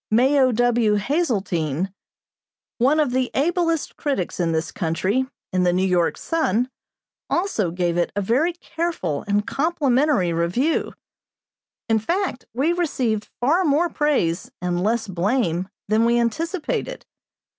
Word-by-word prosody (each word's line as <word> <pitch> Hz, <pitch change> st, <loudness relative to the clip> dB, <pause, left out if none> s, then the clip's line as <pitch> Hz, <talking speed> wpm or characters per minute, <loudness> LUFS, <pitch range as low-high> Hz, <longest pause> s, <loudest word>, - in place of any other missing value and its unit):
Mayo 260 Hz, +3 st, +4 dB
W. 240 Hz, -2 st, +2 dB
Hazeltine, 195 Hz, -, -1 dB, 0.9 s
one 275 Hz, +6 st, +3 dB
of 295 Hz, -5 st, +2 dB
the 255 Hz, 0 st, 0 dB
ablest 330 Hz, +2 st, 0 dB
critics 270 Hz, -, -2 dB
in 170 Hz, -2 st, +1 dB
this 160 Hz, 0 st, -1 dB
country, 190 Hz, +9 st, 0 dB, 0.3 s
in 185 Hz, -, +2 dB
the 180 Hz, -1 st, +3 dB
New 185 Hz, +2 st, +1 dB
York 180 Hz, -3 st, +1 dB
Sun, 255 Hz, -, 0 dB, 0.6 s
also 340 Hz, -, 0 dB
gave 175 Hz, 0 st, -1 dB
it 175 Hz, -, +1 dB
a -, -, 0 dB
very 265 Hz, -, +1 dB
careful 330 Hz, -, -3 dB
and 205 Hz, 0 st, +1 dB
complimentary 275 Hz, -, +1 dB
review. 175 Hz, -, 0 dB, 0.9 s
In 225 Hz, -1 st, +3 dB
fact, 345 Hz, -, -2 dB
we 285 Hz, +8 st, +1 dB
received 250 Hz, -11 st, -1 dB
far 305 Hz, +10 st, +3 dB
more 320 Hz, +2 st, +2 dB
praise 275 Hz, -, 0 dB
and 175 Hz, 0 st, -1 dB
less 225 Hz, +3 st, 0 dB
blame 185 Hz, -1 st, 0 dB, 0.2 s
than 215 Hz, +2 st, +3 dB
we 235 Hz, 0 st, +3 dB
anticipated. 315 Hz, -, -2 dB
235 Hz, 130 wpm, -22 LUFS, 185-295 Hz, 0.9 s, Mayo